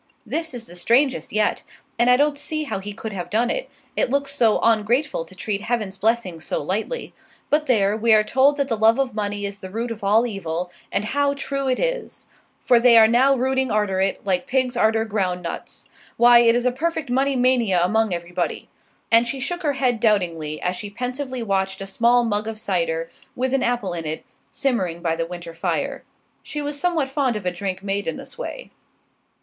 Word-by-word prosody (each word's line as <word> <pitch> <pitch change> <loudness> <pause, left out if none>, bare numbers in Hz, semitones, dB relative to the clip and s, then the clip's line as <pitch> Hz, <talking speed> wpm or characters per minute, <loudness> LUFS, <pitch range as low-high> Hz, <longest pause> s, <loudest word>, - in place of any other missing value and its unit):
This 320 -4 -3
is 235 -2 -6
the 175 - -11
strangest 250 +9 +1
yet, 215 0 +1 0.4
and 240 +1 +4
I 250 - +6
don't 290 +1 +2
see 310 +2 -2
how 275 - -3
he 205 +2 -6
could 220 +1 -7
have 180 -3 -5
done 235 +3 +1
it; - - -3 0.3
it - - +1
looks 280 +1 0
so 225 -5 +4
ongrateful 230 - +1
to 185 - -14
treat 200 +1 -2
Heaven's 215 -4 -2
blessings 195 -6 -1
so - - -2
lightly. 220 - -3 0.4
But 300 +1 +2
there, 210 -5 +3
we 225 +1 +1
are 215 - +4
told 270 +6 +3
that 280 -1 0
the 230 - 0
love 220 +1 +4
of 270 -4 0
money 205 -1 -3
is 200 0 -6
the 190 - -8
root 230 +4 -3
of 225 -2 -7
all 215 +4 +4
evil, 180 -5 -4 0.2
and 205 - 0
how 285 +4 +1
true 275 -1 -2
it 255 - +1
is! - - -3 0.4
for 240 - +5
they 235 -1 +6
are 220 -1 +8
now 260 +4 +4
rooting 265 0 0
arter 210 -3 0
it, 195 0 -1
like 185 -2 0
pigs 255 -1 0
arter 225 -1 +2
ground 185 -4 -2
nuts. 170 - -7 0.3
Why, 240 0 +7
it 230 -1 +5
is 240 +1 0
a 250 - +3
perfect 315 0 -2
money 270 +2 +2
mania 245 -7 +3
among 220 +3 +2
everybody!" 175 0 -3 0.4
And 230 +1 +5
she 270 +3 -3
shook 350 +7 -3
her 295 -4 0
head 255 -4 0
doubtingly, 170 -8 0
as 180 +1 0
she 205 +3 -6
pensively 250 +3 -4
watched 190 -2 -1
a 195 - -5
small 235 +5 +3
mug 210 -1 -1
of 225 -1 -4
cider, 165 -5 -1 0.2
with 260 +1 -1
an 270 - +2
apple 235 -7 -1
in 165 -2 -5
it, 155 +1 -4 0.2
simmering 185 - -1
by 165 -1 +1
the 165 0 -2
winter 175 -1 -8
fire. 165 - -2 0.4
She 300 - -6
was 290 0 -3
somewhat 335 -5 +1
fond 270 -4 0
of 210 -3 -5
a 180 - +1
drink 190 +1 -4
made 200 0 -2
in 165 - -2
this - - -10
way. - - -7
225 Hz, 210 wpm, -22 LUFS, 195-260 Hz, 0.4 s, are